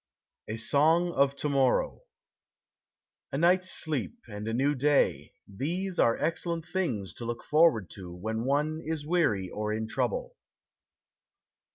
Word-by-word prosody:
A 110 - -4
SONG 160 +9 +3
OF 140 -3 +2
TO 150 - -2
MORROW 135 -3 +2 1.3
A - - -2
night's 180 +3 +3
sleep 145 - -3
and 105 -1 -6
a 115 - -1
new 140 +4 +2
day 145 +1 +1
these 175 - -3
are 115 - +4
excellent 165 +1 -2
things 125 - -2
to 120 - -8
look 120 0 -4
forward 150 - +4
to 90 -3 -9
when 110 +6 -3
one 150 +4 0
is 155 -2 -3
weary 150 - +1
or 105 0 -2
in 110 +1 -2
trouble. - - -2
140 Hz, 140 wpm, -29 LUFS, 110-165 Hz, 1.3 s, are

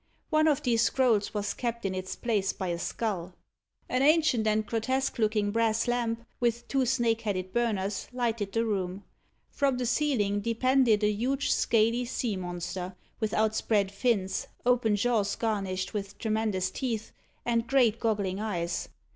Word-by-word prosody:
One 310 0 +4
of 295 -3 +2
these 230 -2 +2
scrolls 230 -4 +2
was 205 0 -1
kept 235 -2 -3
in 190 - 0
its 185 0 -4
place 210 -5 0
by 185 - -4
a 170 0 -2
skull. 185 -2 -3 0.5
An 255 - 0
ancient 295 -7 +4
and 215 0 +2
grotesque 260 +5 -1
looking 210 -2 +1
brass 225 +1 +1
lamp, 235 -1 -1
with 235 -1 0
two 270 -2 +1
snake 230 -2 +1
headed 185 -3 -3
burners, 210 -4 -1
lighted 230 -5 -1
the 230 +2 +1
room. 195 -2 -2 0.5
From 275 -3 +1
the 250 - -1
ceiling 230 -6 +1
depended 230 0 +3
a 210 - +4
huge 260 +7 0
scaly 230 +2 +2
sea 235 -3 -2
monster, 180 0 -5 0.2
with 220 -2 -1
outspread 215 -2 +1
fins, 200 -3 0 0.2
open 245 -4 +3
jaws 205 -2 +1
garnished 195 -4 -2
with 200 -2 -4
tremendous 215 -4 0
teeth, 230 -4 -3 0.3
and 235 -1 +1
great 240 -4 +3
goggling 205 -5 0
eyes. 175 -6 -2
220 Hz, 155 wpm, -29 LUFS, 200-240 Hz, 0.5 s, One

